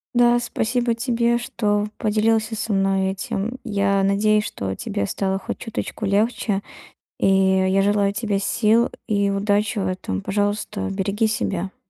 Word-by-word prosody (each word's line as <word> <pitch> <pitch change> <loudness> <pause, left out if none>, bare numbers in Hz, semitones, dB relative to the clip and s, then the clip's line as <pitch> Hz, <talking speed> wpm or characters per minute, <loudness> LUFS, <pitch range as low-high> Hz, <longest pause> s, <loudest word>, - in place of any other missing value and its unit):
Да, 240 0 +5
спасибо 240 +1 0
тебе, 235 0 +1
что 210 -3 -1
поделился 220 +1 +1
со 220 0 -2
мной 195 -1 +1
этим. 195 +5 -4
Я 200 -1 +1
надеюсь, 210 +2 +3
что 95 - -4
тебе 100 - -3
стало 190 - -1
хоть - - -5
чуточку 225 -1 -5
легче, 205 0 +1 0.6
и - - +3
я 190 0 +3
желаю 200 0 +2
тебе 205 -1 -1
сил 225 +4 +2 0.2
и 200 -2 +1
удачи 205 +2 0
в 190 - -1
этом. 185 - -3
Пожалуйста, 205 +1 -1
береги 200 +3 0
себя. 195 -3 -2
205 Hz, 140 wpm, -22 LUFS, 195-220 Hz, 0.6 s, Да